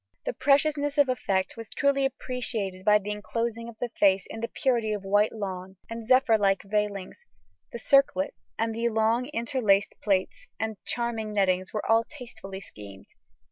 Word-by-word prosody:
The - - -1
preciousness 290 +1 +2
of 285 -2 +5
effect 195 -6 0
was 230 -2 -8
truly 280 -1 +1
appreciated 240 -8 -3
by 210 +1 +6
the 210 0 -5
enclosing 230 +2 -3
of 225 - -12
the 245 +1 -3
face 195 -1 +4
in 225 - -7
the 230 - -2
purity 235 -5 0
of 205 -2 -4
white 205 +2 +3
lawn 190 -3 -6 0.2
and 230 0 -5
zephyr 255 -3 +5
like 195 -1 +2
veilings; 205 - -2 0.5
the - - -5
circlet 275 +4 +3 0.2
and 225 0 0
the 230 +1 0
long 225 +3 +1
interlaced 230 -7 +1
plaits 190 -3 0
and 220 -2 -4
charming 230 -3 -2
nettings 185 -2 +1
were 215 - -3
all 225 0 +4
tastefully 230 -8 -10
schemed. 100 - -12
220 Hz, 165 wpm, -27 LUFS, 200-250 Hz, 0.5 s, by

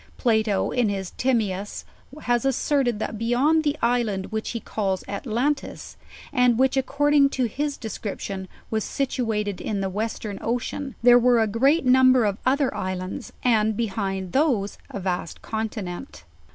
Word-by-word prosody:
Plato 220 -4 +1
in 245 -4 +1
his 195 -2 -3
Timseus 210 -6 -1 0.4
has 240 -1 +1
asserted, 270 -2 +1
that 220 0 -4
beyond 265 +8 +2
the 295 0 0
island 230 -5 0
which 220 0 -3
he 235 - -3
calls 195 -4 -2
Atalantis, 245 +7 -2 0.4
and 250 -2 +4
which, 265 +1 +3
according 285 +1 +3
to 265 -2 -1
his 285 +5 -2
discription, 200 -3 -5 0.2
was 220 -2 0
situated 225 -7 -2
in 205 -2 -2
the 195 -1 -2
Western 210 0 -3
Ocean, 245 +3 -3
there 245 0 +8
were 245 -1 +4
a 225 - +4
great 270 +9 +2
number 255 -1 +5
of 205 0 -1
other 275 0 +2
islands, 185 +5 -4
and 220 -3 +2
behind 195 -4 -2
those 255 -9 +1
a - - -5
vast 180 -3 -3
continent. 220 0 -5
230 Hz, 145 wpm, -24 LUFS, 205-260 Hz, 0.4 s, there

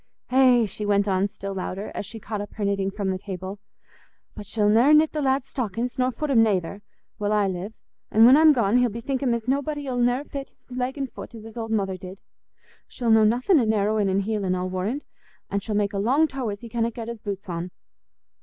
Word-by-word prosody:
Eh!" 255 -3 +5
she 210 +1 -6
went 205 0 +2
on, 190 0 +2
still 200 -1 -7
louder, 190 +2 -5
as - - -5
she 225 - -8
caught 210 0 -4
up 205 - -9
her 210 - -2
knitting 200 -1 0
from 195 -1 -2
the 185 - -3
table, 190 +1 -6 0.8
"but 205 - -9
she'll 210 -1 +1
ne'er 235 +8 +6
knit 310 +1 +4
the 305 - -2
lad's 265 -1 +1
stockin's, 240 +1 -3
nor 255 0 +2
foot 300 +3 -3
'em 235 -4 +5
nayther, 200 -2 0 0.4
while 205 0 -1
I 210 -1 +3
live; 190 +3 -5 0.3
an' 220 +2 +6
when 255 +3 +8
I'm 310 +1 +7
gone, 235 -4 +2
he'll 250 -1 +3
bethink 235 +4 -3
him 250 -4 +2
as 230 0 -6
nobody 285 +2 -1
'ull 250 -2 -2
ne'er 245 +3 +2
fit's 280 -2 -8 0.2
leg 255 +2 -3
an' 275 - -1
foot 245 - -10
as 220 - -10
his 225 0 -11
old 225 -1 -4
mother 195 -4 -1
did. 185 +1 -10 0.7
She'll 235 -2 -1
know 220 -1 +6
nothin' 250 - +3
o' - - +2
narrowin' 210 -1 +1
an' 190 +1 +1
heelin', 200 -3 -1
I 180 - -2
warrand, 185 +9 -3 0.5
an' 200 - +1
she'll 210 +1 -4
make 205 0 0
a 200 - -1
long 270 +10 +3
toe 265 -5 -4
as 200 -1 -6
he 235 - -8
canna 230 0 0
get's 230 -1 -7
boot 200 -2 -5
on. 175 0 -4
220 Hz, 230 wpm, -24 LUFS, 200-250 Hz, 0.8 s, when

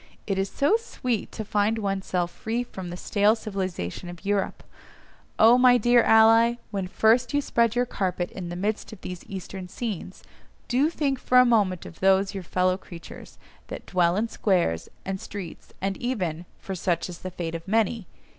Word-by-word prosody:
It 195 -2 -1
is 195 0 -1
so 290 +10 +2
sweet 250 - -3
to 220 - -5
find 210 +2 +1
one's 195 -3 -2
self 175 -1 -1
free 230 +2 -3
from 190 -7 -8
the 175 - -6
stale 205 +3 +2
civilisation 185 - -4
of 175 +2 -11
Europe! 200 -1 -1 0.7
Oh 235 +3 +7
my 250 -1 +6
dear 240 +1 +5
ally, 225 +1 +6 0.2
when 195 -3 -2
first 230 +6 +2
you - - +4
spread 235 -4 +1
your 245 0 +2
carpet 185 -6 -2
in 180 -3 -6
the 175 - -5
midst 205 +6 -2
of 220 - -11
these 180 -1 -7
Eastern 190 -1 -7
scenes, 195 -2 -6 0.4
do 265 +5 +2
think 280 -5 -1
for 250 - +2
a 250 - +8
moment 205 -7 +2
of 160 - -11
those 195 +1 +3
your 195 - -4
fellow 185 +1 0
creatures, 170 -3 -12 0.3
that - - -8
dwell 175 -2 +2
in 220 +3 0
squares, 175 - 0 0.2
and 190 0 -3
streets, 195 -5 -8
and 195 +1 -1
even 180 -9 -3
(for 195 - -6
such 175 -2 -1
is 175 -2 -9
the 185 - -6
fate 170 -2 -5
of 165 +1 -6
many!) 220 -1 +1
195 Hz, 185 wpm, -25 LUFS, 180-230 Hz, 0.7 s, a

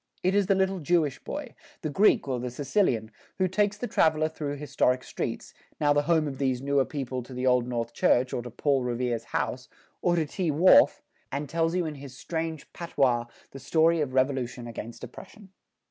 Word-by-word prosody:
It 185 - +2
is 200 -2 +2
the 195 - +4
little 190 0 +1
Jewish 155 -3 0
boy, 290 -4 -6 0.3
the 155 - -2
Greek 195 0 +3
or 130 -2 -1
the 125 +1 -3
Sicilian, 125 - 0 0.3
who 185 - +2
takes 205 +2 +1
the 245 - -3
traveler 155 -8 +2
through 150 -2 -4
historic 130 -3 0
streets, - - -5 0.3
now 145 -1 +3
the 145 - +3
home 160 0 +2
of 135 -2 -6
these 130 -3 0
newer 140 0 +1
people 130 -3 -4
to 125 +1 -11
the 125 +1 -2
Old 125 -1 +3
North 120 -1 -3
Church 125 +2 +2
or - - -1
to 120 - -8
Paul 135 +3 +1
Revere's 120 -1 -2
house, 125 0 -3 0.3
or 175 -1 +2
to 165 -2 +1
Tea 170 +3 -2
Wharf, 160 +5 +5 0.3
and 145 +2 -3
tells 165 +3 0
you 180 -2 +1
in 155 - -3
his 135 -2 -11
strange 160 +1 -4
patois 130 -8 +1 0.3
the 135 - -9
story 165 +2 +3
of 130 -3 -3
revolution 130 -2 0
against 115 0 -8
oppression. 200 0 -11
145 Hz, 195 wpm, -27 LUFS, 125-165 Hz, 0.3 s, Wharf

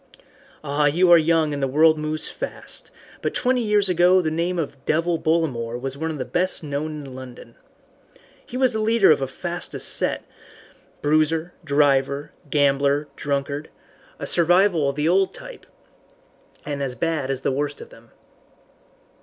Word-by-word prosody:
"Ah, 145 0 0
you 175 +5 +3
are 170 - +10
young 160 -1 +2
and 140 - -4
the 135 - +1
world 155 +4 +4
moves 155 0 -2
fast, - - -5 0.3
but - - -2
twenty 250 0 +1
years 210 -3 +2
ago 180 +1 +4
the 160 -3 -1
name 170 +3 -1
of 140 -4 -4
'Devil' 165 +1 +1
Bollamore 125 -8 -1
was 135 +1 -5
one 160 +3 -3
of 155 - -4
the 130 - -4
best 180 -1 0
known 150 0 -4
in 135 - -10
London. 125 -2 -11 0.9
He 250 - -7
was 260 -2 +2
the 220 - -2
leader 220 -4 +4
of 155 - +4
the 135 - -2
fastest 175 +6 -2
set, - - -1 0.8
bruiser, 155 +3 +1
driver, 140 -1 +1 0.2
gambler, 140 0 +2
drunkard 140 +1 -3 0.5
a - - -5
survival 175 -3 +3
of 140 - -4
the 150 +1 0
old 190 +2 +2
type, - - -11 1.0
and 145 -1 -4
as 130 -3 -3
bad 160 -4 -2
as 135 -1 -2
the - - 0
worst 145 +2 -2
of - - -11
them." 115 0 -17
155 Hz, 160 wpm, -22 LUFS, 140-175 Hz, 1.0 s, are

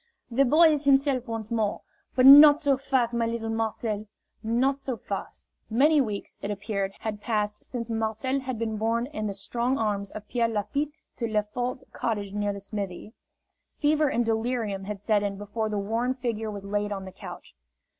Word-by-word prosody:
"The 270 +4 +4
boy 315 +5 +6
is 295 -1 -1
himself 270 -2 +3
once 225 -1 -5
more. 220 -3 0 0.3
But 255 0 +4
not 290 +2 +10
so 280 -2 +3
fast, 260 -3 0
my 235 -1 +1
little 230 -1 -3
Marcel, 220 -1 -2 0.3
not 250 +5 +1
so 265 -3 -4
fast!" - - -6 0.2
Many 290 +6 +4
weeks, 210 -5 -4
it 200 - -4
appeared, 200 -1 -2
had 215 -1 -4
passed 210 -1 -1
since 235 -3 -4
Marcel 225 +4 -1
had 260 -2 -4
been 220 -1 -2
borne 230 +2 0
in 215 -6 -4
the 200 - -4
strong 240 +6 -1
arms 205 -3 -1
of 210 -1 -9
Pierre 235 -1 +1
Lafitte 225 +7 -1 0.3
to 235 - -1
Lefort's 225 +4 -2
cottage 205 -4 -2
near 205 0 0
the 200 - -6
smithy. 200 0 -6 0.6
Fever 300 +1 +3
and 240 -2 +1
delirium 220 -3 -1
had 210 0 -4
set 205 +1 +1
in 200 -1 -2
before 210 +2 -3
the 210 - -2
worn 230 +5 -1
figure 230 -4 -3
was 200 -2 -6
laid 205 +1 -1
on 195 -1 -4
the 190 - -8
couch. 185 -2 -10
225 Hz, 185 wpm, -27 LUFS, 205-255 Hz, 0.6 s, not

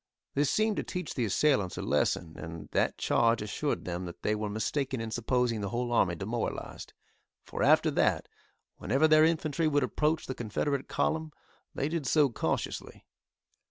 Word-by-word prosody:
This 145 0 +2
seemed 215 0 +1
to - - -1
teach 180 -3 -5
the 125 - 0
assailants 105 -3 +1
a - - -3
lesson, 80 -2 0
and 80 +1 -8
that - - +1
charge 115 -1 +2
assured 105 - -2
them 90 +1 -3
that 85 - -9
they 105 - +1
were 105 0 -2
mistaken 130 +5 -2
in 115 0 -4
supposing 120 -1 0
the 100 - -2
whole 120 +2 -2
army 95 -7 +3
demoralised, 110 +5 -4 0.5
for - - -6
after - - +5
that - - +1 0.5
whenever 135 +9 +2
their 155 0 +6
infantry 160 -1 +1
would 145 -2 +2
approach 150 +6 0
the 130 - -4
Confederate 130 +4 -2
column 160 -1 -1 0.4
they 140 - 0
did 155 -3 -2
so 150 +1 +4
cautiously. - - -3
125 Hz, 165 wpm, -30 LUFS, 105-150 Hz, 0.5 s, their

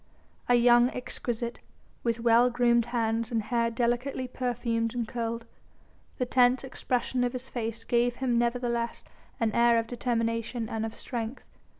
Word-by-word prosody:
A 245 - +6
young 240 0 +6
exquisite, 240 -2 -4 0.4
with 230 -1 0
well 235 +1 +5
groomed 235 -1 +3
hands 230 -1 -1
and 225 -2 0
hair 235 +1 +1
delicately 245 +3 -1
perfumed 240 -2 -2
and 235 -2 -1
curled, 230 -1 -3 0.7
the 250 - 0
tense 250 +1 +3
expression 250 -1 -1
of 245 0 0
his 255 +1 -6
face 230 -2 -4
gave 240 0 +1
him 250 -1 0
nevertheless 235 -1 -1 0.4
an 225 -1 +1
air 235 +1 +4
of 230 - +1
determination 230 -1 -2
and 225 0 -2
of 220 - -9
strength. 235 0 -5
235 Hz, 150 wpm, -28 LUFS, 230-245 Hz, 0.7 s, A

